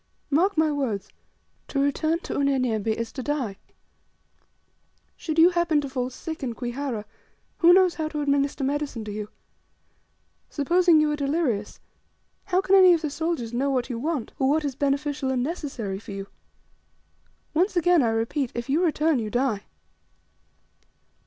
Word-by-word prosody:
Mark 355 +6 +2
my 315 -1 +3
words 230 -9 -2 0.6
to 275 - -2
return 300 +4 +1
to - - -5
Unyanyembe, 255 -6 0
is 225 +1 -1
to 265 - -6
DIE! 255 -8 -2 1.6
Should 315 -1 -4
you 335 +2 +7
happen 340 -3 +2
to 285 - -3
fall 255 -1 -2
sick 320 +5 -7
in 245 -4 -3
Kwihara 245 -2 -4 0.5
who 340 0 +7
knows 365 -1 +5
how 315 -1 -3
to 300 -1 -4
administer 280 0 0
medicine 280 -5 -2
to 210 - -5
you? 210 0 -5 1.2
Supposing 340 +3 +3
you 305 -1 +2
are - - 0
delirious, 275 -7 -1 0.7
how 370 -1 +2
can 385 0 0
any 375 -2 +8
of 325 - -3
the 305 - -2
soldiers 310 -7 -3
know 270 +4 0
what 260 -1 -1
you 230 - -3
want, 295 -3 -2
or 265 - +2
what 305 +1 +1
is 280 - -2
beneficial 280 0 -1
and 255 -2 0
necessary 260 - -4
for 210 -1 -9
you? 195 0 -5 1.3
Once 370 +5 +1
again, 350 -1 +4
I 235 - +2
repeat, 230 +4 -1
if 235 +3 -4
you 320 +6 +2
return, 315 -3 +2
you 215 -2 -3
DIE!" 240 -3 -1
280 Hz, 160 wpm, -25 LUFS, 240-315 Hz, 1.6 s, any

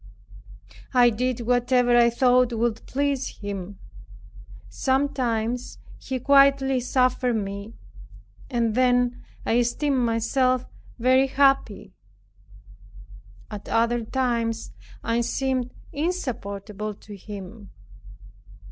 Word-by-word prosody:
I 245 -1 +6
did 250 +2 -2
whatever 245 +1 +2
I 235 0 +6
thought 250 0 +3
would 230 0 -1
please 280 -1 -2
him. 200 -1 -6 0.9
Sometimes 245 - -1 0.2
he 260 -1 -4
quietly 275 0 +4
suffered 250 -1 +1
me, 200 +1 -5 0.7
and 235 -4 0
then 245 0 +2 0.2
I 230 - +2
esteemed 265 +3 0
myself 245 +2 +1 0.3
very 260 +2 +3
happy. 265 -8 +1 1.6
At 205 -1 -8
other 235 +1 +1
times 230 - -1 0.3
I 230 +1 0
seemed 255 +1 -1 0.2
insupportable 215 - -4
to 205 +1 -12
him. 200 +1 -10
240 Hz, 90 wpm, -24 LUFS, 225-260 Hz, 1.6 s, I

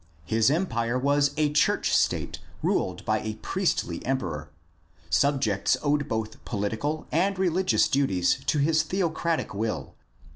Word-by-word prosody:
His 110 +2 +3
empire 125 -8 0
was 140 +2 +2
a 150 -1 +1
church 150 - +2
state - - 0 0.2
ruled 90 -1 -1
by 110 0 +1
a 110 0 -4
priestly 110 - -1
emperor. 85 - -3 0.6
Subjects 110 - +2
owed 145 0 +1
both 110 -1 -4
political 115 +9 -2
and 190 +5 +1
religious 185 0 +2
duties 135 -11 +1
to - - +2
his 155 +2 +3
theocratic 170 -3 -1
will. 110 +2 -3
140 Hz, 125 wpm, -26 LUFS, 110-155 Hz, 0.6 s, His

